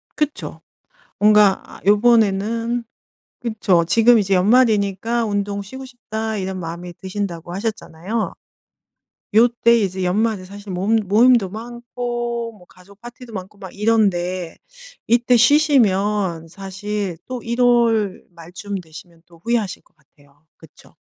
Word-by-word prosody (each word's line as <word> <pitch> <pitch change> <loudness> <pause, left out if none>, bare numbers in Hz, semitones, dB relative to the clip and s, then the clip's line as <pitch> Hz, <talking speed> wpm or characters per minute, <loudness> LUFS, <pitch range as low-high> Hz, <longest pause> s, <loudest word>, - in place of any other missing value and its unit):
그쵸. 300 -1 -3 0.6
뭔가 210 -1 +5
아 - - -13
요번에는 230 +2 +2 0.6
그쵸. 205 -7 +1
지금 230 +5 +5
이제 195 -1 +1
연말이니까 220 +1 +2
'운동 205 -1 -2
쉬고 260 +7 -9
싶다.' 220 -3 -5
이런 190 -1 -4
마음이 170 +1 -7
드신다고 185 -3 -5
하셨잖아요. 215 0 -4 1.0
요때 235 0 +4
이제 190 -2 -2
연말에 205 +1 0
사실 200 0 -10
모 180 +2 -3
모임도 220 0 +4
많고 240 +1 -5
뭐 205 -5 -18
가족 195 +3 -19
파티도 240 0 -12
많고 195 +1 -8
막 190 -3 -10
이런데 185 -5 0 0.5
이때 240 +1 +3
쉬시면 210 - +2
사실 195 0 -5
또 255 -1 -5
1 235 +2 -3
월 230 -5 +2
말쯤 180 +4 -7
되시면 165 0 -14
또 170 -1 -20
후회하실 230 -5 -1
것 - - -34
같아요. 145 +1 -28
그쵸? 160 - -19
210 Hz, 260 characters per minute, -20 LUFS, 185-235 Hz, 1.0 s, 뭔가